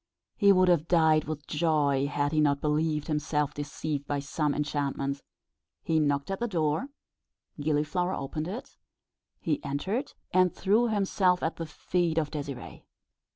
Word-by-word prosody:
He 200 -1 +5
would 185 -1 +5
have 170 -3 +3
died 160 -3 +4
with 150 -1 -5
joy, 145 -3 +1
had 145 0 0
he 155 -1 +2
not 140 -2 +3
believed 150 0 0
himself 150 -2 -1
deceived 145 0 -4
by 145 -1 -1
some 145 +1 -1
enchantment. 140 -1 -2 0.6
He 160 -1 +2
knocked 145 +2 0
at 195 - -2
the 240 - 0
door, 165 - 0 0.7
Gilliflower 155 +5 0
opened 155 +3 -4
it; 215 +8 -7 0.6
he 155 -3 -1
entered, 190 - -2 0.2
and 185 -1 +4
threw 215 +5 +2
himself 195 -4 +2
at 160 - -1
the 165 - -4
feet 170 +2 -1
of 155 -2 0
Désirée. 140 -4 -6
155 Hz, 150 wpm, -28 LUFS, 145-180 Hz, 0.7 s, He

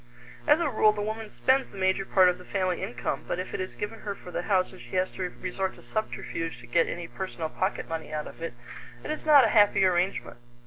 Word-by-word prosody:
As 295 +2 +6
a 340 - +1
rule, 215 -5 +4
the 210 -1 -3
woman 220 +1 -4
spends 260 +4 +2
the 200 - -12
major 190 0 +1
part 185 -1 +5
of 180 0 +1
the - - -11
family 185 -2 -1
income, 120 - -3
but - - -1
if 185 - -5
it - - -2
is 185 - -5
given 215 +2 -5
her 205 -1 -4
for 180 - -11
the - - -2
house 185 -1 +1
and 185 - -13
she - - -9
has 185 0 +1
to 185 -1 -3
resort 190 +1 -2
to - - -16
subterfuge 165 - -3
to 120 - -12
get 165 +8 +2
any 170 -1 -4
personal 175 -4 -4
pocket 190 +5 -2
money 165 -1 -5
out 150 -1 -3
of - - -11
it, 165 -7 -4 0.5
it - - -3
is 310 0 -5
not 290 -3 +9
a - - +3
happy 205 -3 +5
arrangement. 180 -3 0
190 Hz, 250 wpm, -28 LUFS, 180-210 Hz, 0.5 s, not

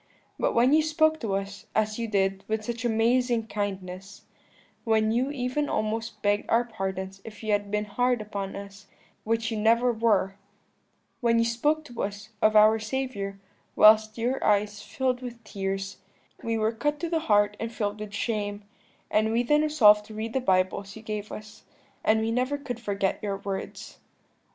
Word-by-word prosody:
But - - 0
when 245 +4 +4
you 315 - +6
spoke 315 0 +2
to 210 -5 -1
us, 195 -1 -5
as 215 +1 0
you 230 - -2
did, 195 -2 0
with 220 0 -2
such 235 0 -4
amazing 235 0 +2
kindness 195 -2 -5 0.6
when 220 -1 +2
you 250 +4 +1
even 285 +1 -2
almost 225 +1 -2
begged 205 0 +1
our 230 +1 +4
pardons 195 -4 -5
if 220 -1 -11
you 215 - -1
had 205 0 0
been 210 +1 -1
hard 245 +4 +1
upon 200 -2 -5
us, 200 0 -10 0.4
which 225 +1 0
you 220 - -2
never 230 +3 +4
were 215 -4 +1 0.8
when 230 -1 +2
you 230 - +3
spoke 295 +7 0
to 240 -4 -6
us 205 +1 -5
of 215 0 +4
our 215 +1 +6
Saviour, 215 -4 -3 0.4
whilst 215 +1 +6
your 245 +3 -1
eyes 210 0 +1
filled 255 -1 -2
with 240 -2 -8
tears, 195 -1 -4 0.4
we 230 0 -1
were 220 0 +1
cut 295 +6 -1
to 340 - -1
the 330 -1 0
heart 205 -7 +2
and 230 0 -3
filled 210 -2 -3
with 210 -1 -6
shame, 205 -1 -2 0.5
and 215 +1 +2
we 235 +2 +2
then 295 +5 +3
resolved 215 -9 +5
to 215 - -10
read 220 +1 -4
the 265 - 0
Bibles 190 -1 0
you 220 - -11
gave 210 -1 -5
us. 215 0 -9 0.4
And 220 0 +3
we 225 +1 0
never 255 +4 0
could 245 -4 -6
forget 200 -4 -1
your 200 -2 -2
words. 195 -1 -6
220 Hz, 180 wpm, -27 LUFS, 205-240 Hz, 0.8 s, you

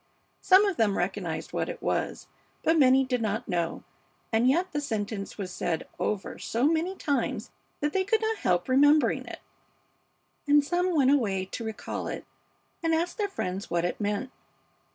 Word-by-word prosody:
Some 380 +2 +6
of 395 -4 -1
them 210 -3 +2
recognized - - -3
what - - -1
it - - -6
was, - - -2 0.4
but 320 - +3
many 265 -1 +6
did 250 -2 -1
not 220 +2 -2
know, 170 -2 -2 0.5
and 230 +3 +3
yet 355 +7 +1
the 295 - -2
sentence 210 -6 -4
was 190 -3 -5
said 165 -3 -2
over 205 -2 -2
so 235 +4 0
many 330 +4 0
times 285 -6 -2 0.3
that 295 +1 0
they 385 - +2
could 435 +3 +2
not 445 0 -1
help 180 - +1
remembering 290 +3 +4
it; - - -8 1.1
and 290 0 +5
some 355 +2 0
went 275 -3 +4
away 200 -9 +1
to 230 - -6
recall 220 -1 -5
it - - -5 0.6
and 330 -1 +2
ask 345 +2 -1
their 415 -2 0
friends 190 - -4
what 170 0 0
it 175 - -3
meant. 210 +5 -2
265 Hz, 175 wpm, -28 LUFS, 205-330 Hz, 1.1 s, Some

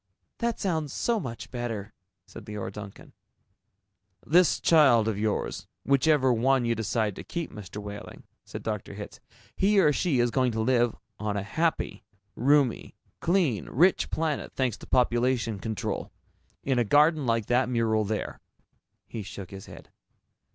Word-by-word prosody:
"That 235 -1 -1
sounds 160 -7 -1
so 235 -2 0
much 120 - -7
better," 115 -4 -4 0.3
said - - -11
Leora 105 -2 -5
Duncan. 100 -1 -10 1.1
"This 175 +3 +4
child 135 -9 +5
of 105 -2 -1
yours 105 -1 -2 0.2
whichever 140 -1 +3
one 130 +2 +2
you 115 - +2
decide 110 -2 -1
to - - -7
keep, 170 -1 -5
Mr. 100 -1 -9
Wehling," 105 0 -8 0.2
said - - -8
Dr. - - -4
Hitz. - - -8 0.4
"He 200 +1 +3
or 150 -5 +5
she 145 -4 +1
is 120 0 +2
going 130 -2 +1
to 110 - -2
live 120 0 +2 0.2
on 105 -1 -2
a 100 - -2
happy, 160 -3 -1 0.3
roomy, 135 -1 +2 0.2
clean, 170 - +1
rich 175 +8 +3
planet, 155 -3 -2
thanks 130 -5 0
to - - -13
population 120 -3 +1
control. 110 +1 -4 0.5
In 130 -3 +1
a - - +4
garden 150 +4 +4
like 115 -2 +1
that 125 +3 +2
mural 115 -3 +1
there." 105 +1 -3 0.7
He 115 - -6
shook 100 -2 -8
his 95 -1 -9
head. - - -13
120 Hz, 150 wpm, -27 LUFS, 110-150 Hz, 1.1 s, child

